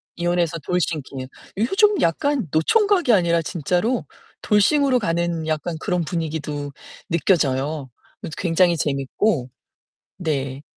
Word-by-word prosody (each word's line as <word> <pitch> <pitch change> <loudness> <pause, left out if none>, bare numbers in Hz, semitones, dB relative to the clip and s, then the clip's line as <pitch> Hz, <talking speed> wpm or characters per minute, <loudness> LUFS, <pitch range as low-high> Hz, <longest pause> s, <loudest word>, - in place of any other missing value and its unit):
이혼해서 175 -1 0
돌싱킹. 150 -6 -2 0.3
요즘 385 - +3
약간 250 - +1
노총각이 360 - +3
아니라 170 -3 +3
진짜로 180 - -1 0.4
돌싱으로 255 +5 +3
가는 170 -4 -1
약간 160 +2 -2
그런 180 -4 -1
분위기도 150 -3 -3 0.4
느껴져요. 150 -5 +1 0.3
그것도 - - -6
굉장히 175 -1 +3
재밌고. 140 - 0 0.7
네. 140 -5 -2
170 Hz, 275 characters per minute, -22 LUFS, 150-205 Hz, 0.7 s, 요즘